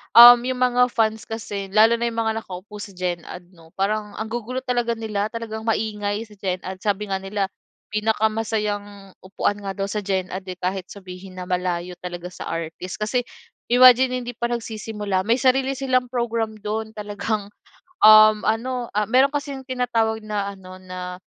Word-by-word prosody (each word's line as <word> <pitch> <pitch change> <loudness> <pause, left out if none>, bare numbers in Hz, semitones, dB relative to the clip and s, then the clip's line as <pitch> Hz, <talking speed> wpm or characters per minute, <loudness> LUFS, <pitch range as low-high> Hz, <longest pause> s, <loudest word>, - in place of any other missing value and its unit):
um, 240 +1 +12
'yong 255 - 0
mga 250 0 +4
fans 220 -1 +1
kasi, 205 -3 -5
lalo 225 +2 +6
na 235 - 0
'yong 230 - -4
mga 220 0 0
nakaupo 205 +1 -9
sa 205 -2 -8
Gen 180 -1 -2
Ad 175 0 -10
'no, 165 -3 -18
parang 210 +1 -1
ang 220 +1 -5
gugulo 240 +2 -4
talaga 240 -2 0
nila, 215 -2 -2
talagang 220 -1 -6
maingay 210 -1 -1
sa 220 - -17
Gen 185 -2 -2
Ad. 185 0 -6
Sabi 205 0 -1
nga 190 - 0
nila, 195 0 -2 0.4
pinakamasayang 210 -2 -1
upuan 200 +2 -2
nga 195 -1 -5
daw 195 0 -3
sa 210 - -1
Gen 190 -2 -2
Ad 190 +1 -6
eh, 185 - -5
kahit 185 0 -3
sabihin 185 -1 -10
na 185 - -5
malayo 180 -1 -2
talaga 180 0 -7
sa - - -8
artist 165 +2 -5
kasi 225 +4 -1 0.4
imagine 255 +1 +6
hindi 245 - -5
pa 235 0 -2
nagsisimula 215 -4 -3
may 230 - +4
sarili 265 +1 +2
silang 255 -2 +1
program 230 -3 -2
do'n. 220 +1 -4
Talagang 210 0 -3 0.5
um 215 0 +8
ano, 240 +2 -1
ah, 210 - +2
meron 260 +4 +5
kasing 280 -2 -4
tinatawag 230 -4 0
na 205 -2 -2
ano 185 -1 -12
na 180 -1 -7
215 Hz, 175 wpm, -23 LUFS, 195-230 Hz, 0.5 s, um